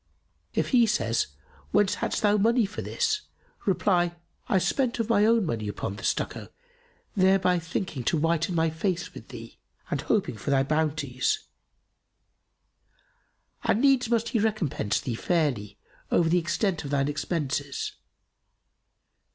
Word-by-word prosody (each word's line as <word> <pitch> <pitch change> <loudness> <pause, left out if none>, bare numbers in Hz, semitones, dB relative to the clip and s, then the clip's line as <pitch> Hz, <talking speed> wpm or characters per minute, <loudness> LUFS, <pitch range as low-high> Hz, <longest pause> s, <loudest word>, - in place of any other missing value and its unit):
If 160 - +1
he 240 -3 +5
says, 115 - +1 0.4
'Whence 205 -2 +3
hadst - - -1
thou 205 -1 +5
the 210 - +3
money 230 +2 +3
for 195 - -6
this?' 435 -3 0 0.5
reply, 175 -2 +2 0.3
'I 195 - +4
spent 250 +6 0
of 230 0 -1
my 210 -2 +4
own 230 -3 +4
money 115 -8 -2
upon 100 -1 -4
the 105 - -10
stucco, - - -1 0.7
thereby 185 -2 +4
thinking 165 -4 -4
to 165 - +2
whiten 165 +3 +1
my 160 -1 +2
face 175 +2 -2
with - - -11
thee - - -10 0.3
and - - 0
hoping 195 - 0
for 105 - -5
thy 135 -1 +4
bounties.' 150 -3 0 2.2
And 210 - +2
needs 270 -4 +4
must 230 -1 +1
he 235 - +1
recompense 180 - 0
thee 125 - -3
fairly 120 - -1 0.3
over 165 -1 +3
the 180 +2 +4
extent 170 +2 -1
of 140 - -5
thine 140 -1 +1
expenses. 145 -2 -2
175 Hz, 145 wpm, -27 LUFS, 145-210 Hz, 2.2 s, he